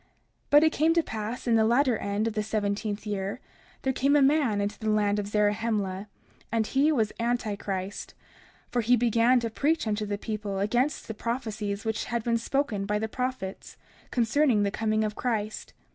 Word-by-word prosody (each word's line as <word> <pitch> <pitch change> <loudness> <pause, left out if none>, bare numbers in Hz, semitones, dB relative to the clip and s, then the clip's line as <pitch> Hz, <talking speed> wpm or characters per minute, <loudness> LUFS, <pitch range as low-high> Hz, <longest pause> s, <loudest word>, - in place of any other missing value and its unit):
30:6 - - -37 0.4
But 295 +1 +7
it 315 - +4
came 320 +2 +2
to 335 - +3
pass 220 0 -5
in 235 - +2
the 225 -1 +5
latter 245 +3 +3
end 205 +1 -1
of 225 - -2
the 215 - 0
seventeenth 210 0 -2
year, 200 +1 -3 0.4
there 265 - +1
came 275 +3 +2
a 290 - +5
man 270 -7 +3
into 205 +1 -2
the 220 - -2
land 210 -1 +2
of 200 - -3
Zarahemla, 210 -2 0 0.4
and 225 -1 +1
he 280 +7 +2
was 225 -8 +1
Anti 235 -3 0
Christ, 195 0 -5 0.6
for 245 - +1
he 240 +3 +4
began 235 +1 +3
to 230 -1 -3
preach 305 +7 +1
unto 210 -1 -1
the 205 0 -2
people 210 -2 -4
against 240 +9 0
the 220 - -4
prophecies 215 -3 -3
which 220 -1 -1
had 235 -1 -2
been 230 0 +1
spoken 230 -5 -1
by 210 0 +1
the 220 +1 -2
prophets, 250 -5 -4 0.3
concerning 240 -1 +2
the 200 - 0
coming 215 0 0
of 215 -1 -1
Christ. 215 -3 -3
220 Hz, 190 wpm, -27 LUFS, 210-245 Hz, 0.6 s, But